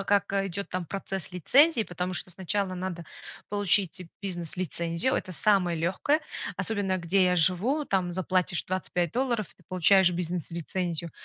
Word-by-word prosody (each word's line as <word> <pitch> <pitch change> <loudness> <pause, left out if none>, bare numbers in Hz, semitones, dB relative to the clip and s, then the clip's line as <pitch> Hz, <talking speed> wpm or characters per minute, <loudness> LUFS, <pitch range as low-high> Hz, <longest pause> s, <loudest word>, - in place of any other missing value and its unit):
как 200 0 +1
идёт 195 -2 -2
там 180 -1 -3
процесс 195 0 -4
лицензии, 260 - +4
потому 180 -1 -4
что 180 - -2
сначала 190 +2 -2
надо 180 -2 -5 0.5
получить 200 -3 +2 0.2
бизнес-лицензию. 175 - -1
Это - - -3
самое 185 -2 +3
лёгкое, 190 - +1 0.4
особенно 195 -1 +1
где 185 +2 +2
я 180 0 +2
живу, 190 - +2
там 185 -7 0
заплатишь 185 -1 0
25 180 -2 -2
долларов, 240 -5 0
ты - - -25
получаешь 185 +1 +4
бизнес-лицензию. 170 0 -3
185 Hz, 135 wpm, -27 LUFS, 175-200 Hz, 0.5 s, лицензии